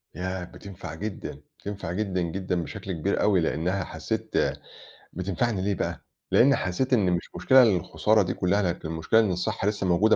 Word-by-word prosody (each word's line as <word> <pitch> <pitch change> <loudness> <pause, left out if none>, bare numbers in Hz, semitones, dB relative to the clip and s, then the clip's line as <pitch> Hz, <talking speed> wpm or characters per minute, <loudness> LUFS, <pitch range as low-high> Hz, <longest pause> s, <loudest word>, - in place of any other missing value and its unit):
ياه! 95 0 -3
بتنفع 90 -2 -9
جدًا، 105 +3 -6 0.2
بتنفع 100 -4 -5
جدًا، 95 -2 -1
جدًا، 90 +1 -2
بشكل 100 +1 -6
كبير 95 +3 -1
أوي، 100 -3 +4
لإنها 85 +4 0
حسّيت - - -4 0.8
بتنفعني 95 +4 -1
ليه 100 +1 0
بقى؟ - - -3 0.3
لإن 140 +3 +6
حسّيت 110 +9 -1
إن 100 -7 +4
مش 85 -1 -2
مشكلة 130 0 +6
الخسارة 105 +1 +3
دي - - -2
كلّها 95 +3 +1
لكن 90 -4 -2
المشكلة 80 +7 +2
إن 110 -4 +3
الصحة 90 +2 -1
لسّه 105 -2 0
موجودة 95 +5 +4
95 Hz, 165 wpm, -26 LUFS, 90-105 Hz, 0.8 s, لإن